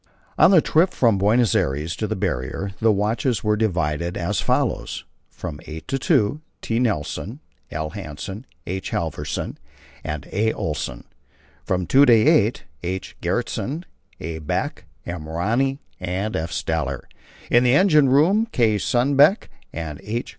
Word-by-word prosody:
On - - +6
the 185 -5 +6
trip 170 +4 +2
from 115 -6 +3
Buenos 110 +4 +3
Aires 75 +6 0
to 110 - -2
the - - -2
Barrier 95 0 -2
the 115 -1 +4
watches 105 +3 0
were 105 -1 +2
divided 85 -5 -1
as 90 +1 -1
follows: - - -1 0.2
From 80 -5 -7
eight 80 +1 -8
to 135 0 0
two: 135 -1 +2 0.2
T. 115 +1 0
Nilsen, 110 - -2 0.3
L. 80 0 -4
Hansen, 95 - -7 0.2
H. 95 +1 -4
Halvorsen, 80 -2 -3 0.4
and 75 -1 -5
A. 110 +3 +1
Olsen. 75 -5 -4 0.6
From 90 -1 -1
two 140 - +5
to 120 - +8
eight: 115 0 +4 0.2
H. 95 +2 -4
Gjertsen, 155 +6 -2 0.4
A. 80 0 -5
Beck, 75 - -3 0.2
M. 85 -3 -5
Rönne, 115 +12 0 0.2
and 95 +4 -2
F. 80 +1 -2
Steller. - - -2 0.5
In 120 +1 +5
the 125 +1 +4
engine 155 -7 +5
room: 180 - +4
K. 110 -4 +3
Sundbeck 140 - +3 0.2
and 75 -3 -6
H. 115 +4 -3
105 Hz, 145 wpm, -22 LUFS, 85-125 Hz, 0.6 s, to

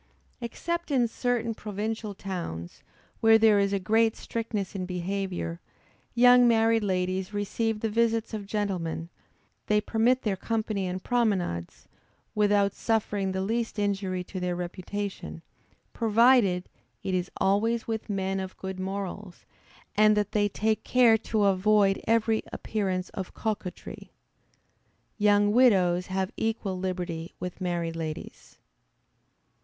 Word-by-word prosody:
Except 340 +9 -3
in 255 -4 +3
certain 235 -1 -1
provincial 215 0 -4
towns, 170 - -6 0.4
where 225 0 +6
there 220 -2 +5
is 200 0 +2
a 200 - +1
great 220 +3 +2
strictness 220 -4 -4
in 185 -2 -4
behavior, 180 -1 -3 0.6
young 245 0 +7
married 225 -1 +3
ladies 185 +1 -1
receive 210 +2 -1
the 225 - +1
visits 230 0 +1
of 205 -2 -5
gentlemen; 180 -6 -2 0.6
they 210 0 +3
permit 235 +4 +1
their 210 -3 0
company 215 -2 -2
in 185 +1 -4
promenades, 195 - -1 0.5
without 205 -1 +3
suffering 205 -3 -1
the 190 0 -2
least 230 +3 -2
injury 195 -3 -1
to 185 +1 -7
their 180 -1 -1
reputation, 180 0 -5 0.5
provided 225 -5 +4 0.4
it 190 -1 -2
is 185 0 -1
always 225 +4 +1
with 220 -1 -4
men 195 -1 -1
of 190 0 -6
good 190 -1 -6
morals, 195 0 -5 0.5
and 215 0 +5
that 205 -1 0
they 205 -1 +2
take 215 +2 0
care 245 -3 +5
to 220 -1 0
avoid 195 0 +3
every 225 -1 +2
appearance 190 -4 -2
of 190 -2 -7
coquetry. 210 -4 -5 1.1
Young 205 0 +4
widows 190 -7 +4
have 190 0 -2
equal 215 -4 -2
liberty 180 -3 -4
with 180 +1 -6
married 170 -2 -2
ladies. 160 -2 -7
205 Hz, 130 wpm, -27 LUFS, 185-225 Hz, 1.1 s, young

